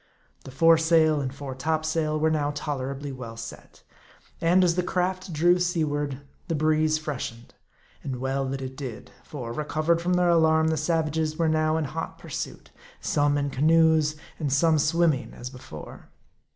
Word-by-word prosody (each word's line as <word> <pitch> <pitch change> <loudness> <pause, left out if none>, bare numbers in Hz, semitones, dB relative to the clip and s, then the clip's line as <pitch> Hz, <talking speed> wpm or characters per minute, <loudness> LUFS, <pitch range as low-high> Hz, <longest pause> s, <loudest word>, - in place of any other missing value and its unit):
The - - -8
foresail 160 +1 +4
and 130 -2 -3
fore 140 -1 -7
topsail 155 +2 -1
were 160 +1 +2
now 145 -2 0
tolerably 140 -1 -4
well 120 -3 -8
set; 115 0 -10 0.6
and 175 +3 +4
as 175 -2 +3
the 180 - +1
craft 185 +1 -2
drew 175 +3 +3
seaward, 145 -6 -1 0.3
the 165 - -1
breeze 155 +1 +2
freshened. 140 -6 -6 0.5
And 135 - -3
well 135 +2 -1
that 135 0 -4
it 130 0 -6
did; 130 -5 -7
for, 120 -6 -6
recovered 155 +4 0
from 180 +1 0
their 180 0 +3
alarm, 160 -1 +4
the 160 - +1
sav, 160 0 0
ages 155 0 -2
were 165 - +2
now 155 0 +2
in 160 - 0
hot 160 +4 -5
pursuit; - - -7 0.3
some 145 0 +1
in 140 -1 -1
canoes, 160 +1 +3 0.2
and 145 -4 -1
some 155 +3 +3
swimming 155 -6 +1
as 125 +1 -7
before. 125 - -11
155 Hz, 165 wpm, -26 LUFS, 135-160 Hz, 0.6 s, foresail